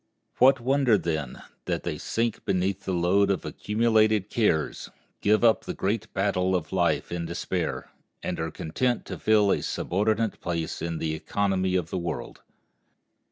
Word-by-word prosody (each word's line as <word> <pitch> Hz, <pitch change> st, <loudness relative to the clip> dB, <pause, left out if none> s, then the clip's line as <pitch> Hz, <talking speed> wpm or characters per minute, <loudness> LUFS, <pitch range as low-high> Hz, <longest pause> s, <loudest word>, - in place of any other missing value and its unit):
What 135 Hz, +2 st, +6 dB
wonder, 130 Hz, -2 st, +3 dB
then, 80 Hz, -8 st, -3 dB, 0.2 s
that -, -, -2 dB
they -, -, -3 dB
sink 115 Hz, -1 st, -2 dB
beneath 95 Hz, 0 st, -1 dB
the 95 Hz, -, -1 dB
load 95 Hz, +3 st, +3 dB
of 100 Hz, -, -1 dB
accumulated 110 Hz, -2 st, +1 dB
cares, 80 Hz, -10 st, 0 dB, 0.3 s
give 105 Hz, +2 st, +3 dB
up 115 Hz, -2 st, +4 dB
the -, -, -4 dB
great 100 Hz, +2 st, -2 dB
battle 95 Hz, -1 st, +1 dB
of 90 Hz, 0 st, -3 dB
life 90 Hz, -2 st, +1 dB
in 85 Hz, -1 st, -3 dB
despair, 85 Hz, +1 st, -3 dB, 0.3 s
and -, -, -3 dB
are 80 Hz, 0 st, -2 dB
content 120 Hz, +12 st, -1 dB
to -, -, -6 dB
fill 105 Hz, -2 st, +4 dB
a -, -, +1 dB
subordinate 105 Hz, +4 st, -1 dB
place 85 Hz, -3 st, -3 dB
in 85 Hz, 0 st, -2 dB
the 80 Hz, -1 st, -2 dB
economy 95 Hz, +2 st, 0 dB
of 85 Hz, -3 st, -1 dB
the 95 Hz, -, -1 dB
world? 85 Hz, -4 st, -5 dB
95 Hz, 160 wpm, -26 LUFS, 85-110 Hz, 0.3 s, What